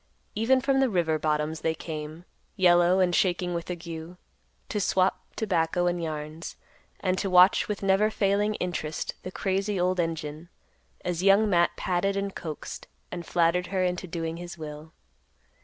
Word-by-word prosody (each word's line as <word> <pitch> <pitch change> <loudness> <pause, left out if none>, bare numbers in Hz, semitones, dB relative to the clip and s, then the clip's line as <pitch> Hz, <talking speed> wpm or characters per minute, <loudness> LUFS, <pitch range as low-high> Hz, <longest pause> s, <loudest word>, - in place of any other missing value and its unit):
Even 250 +5 +3
from 270 +1 +2
the 265 -1 +3
river 165 -6 +1
bottoms 155 +1 -1
they 160 0 0
came, 155 +1 -7 0.3
yellow 175 -1 +5
and 180 -1 +3
shaking 180 -1 +1
with 170 0 -4
ague, 170 0 -6 0.5
to 210 - -2
swap 190 -1 +2
tobacco 175 -4 +1
and 175 0 0
yarns, 155 0 -5 0.5
and 185 -1 0
to 195 - -1
watch 180 +1 +6
with 205 -1 -4
never 195 +2 +3
failing 205 0 +1
interest 160 -4 -3
the 185 - -7
crazy 195 +1 -1
old 180 +1 +1
engine, 160 -1 -3 0.6
as 175 -1 -1
Young 200 +3 +5
Matt 175 -3 +2
patted, 195 +2 0
and 200 0 -2
coaxed, 155 -3 -7 0.2
and 175 -2 -6
flattered 175 +1 +2
her 190 -1 0
into 180 0 -1
doing 165 -1 -4
his 175 0 -8
will. 155 0 -8
175 Hz, 155 wpm, -27 LUFS, 165-195 Hz, 0.6 s, watch